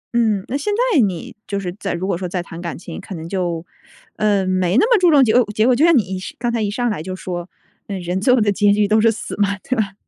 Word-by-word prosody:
嗯， 215 -5 +1
那 255 - -3
现 285 +9 -1 0.2
在 300 - +5
你 190 -8 -1
就 200 - -2
是 180 -2 -5
再 195 - -3
如 175 +2 -3
果 195 - 0
说 185 0 -4
再 180 0 -2
谈 170 0 -9
感 170 -2 -5
情， 170 -1 -8
可 195 - -8
能 160 0 -7
就， 175 -3 -2 0.5
呃， 205 -2 +2
没 185 +1 +1
那 - - +5
么 445 - +5
注 360 -1 +5
重 290 -4 +6
结 220 -3 +2
果 250 +1 +5
结 215 +1 +2
果。 250 0 +4
就 275 - +2
像 335 0 +6
你 190 -4 -1
是 185 - -8
刚 240 +1 -1
才 235 -1 -1
一 210 - 0
上 245 +4 -1
来 200 - -4
就 185 +3 -5
说： 180 -1 -6 0.4
“嗯， 195 -2 -4
人 180 +1 -3
最 250 - +3
后 255 - +4
的 210 -2 +2
结 205 +1 +3
局 205 0 +2
都 215 +1 +3
是 225 0 +4
死 220 - -6
嘛。” 200 0 +1
对 255 - 0
吧？ 205 -5 -1
200 Hz, 310 characters per minute, -19 LUFS, 185-230 Hz, 0.5 s, 重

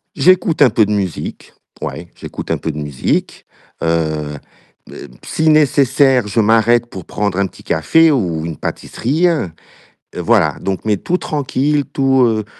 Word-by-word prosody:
J'écoute 175 -4 +3
un 135 - +7
peu 110 0 +3
de 105 - -2
musique, 95 -4 -4 0.3
ouais, 85 +1 -5
j'écoute - - -8
un - - +1
peu 80 - -3
de 75 - -9
musique. 75 -3 -2 0.4
Heu, 80 -3 -1 0.5
b - - -14
heu, - - -9 0.2
si 160 0 +1
nécessaire, 140 -5 +3
je 105 +3 -1
m'arrête 115 +2 +3
pour 95 -6 -9
prendre 100 -3 -2
un 100 -1 +1
petit - - -17
café 160 - +3
ou 85 - -1
une 85 -2 -5
pâtisserie, 155 +9 -1 0.9
voilà, - - +1
donc, 95 +1 -3
mais 105 -3 +1
tout 180 - -1
tranquille, 145 -1 -1
tout, 135 -1 +2
heu 110 -3 0
110 Hz, 155 wpm, -17 LUFS, 90-140 Hz, 0.9 s, un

